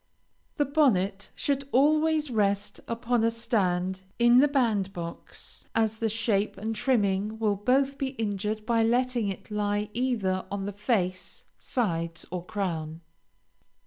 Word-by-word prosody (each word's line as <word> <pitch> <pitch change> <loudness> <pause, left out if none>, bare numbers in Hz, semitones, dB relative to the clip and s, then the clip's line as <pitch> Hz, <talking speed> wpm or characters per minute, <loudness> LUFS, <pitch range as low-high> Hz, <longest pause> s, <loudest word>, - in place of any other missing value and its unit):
The 290 - +2
bonnet 210 -10 +2
should 275 -1 -1
always 305 +2 +3
rest 205 -2 0
upon 235 0 0
a 230 - +4
stand 190 -5 0 0.2
in 240 +1 +6
the 290 - +6
band 225 -9 +1
box, 170 -1 -8
as 220 -1 +1
the 225 - +1
shape 215 -2 0
and 220 +3 -3
trimming 210 -3 +1
will 215 -2 +1
both 265 +6 +1
be 275 - 0
injured 210 0 -2
by 230 -1 +2
letting 240 0 +2
it 195 +2 -6
lie 205 0 -1
either 215 -7 0
on 200 -1 -3
the 205 - -4
face, 190 -4 -1
sides, 170 -8 -2
or 180 -1 -3
crown. 170 -5 -3
215 Hz, 140 wpm, -27 LUFS, 195-245 Hz, 0.2 s, in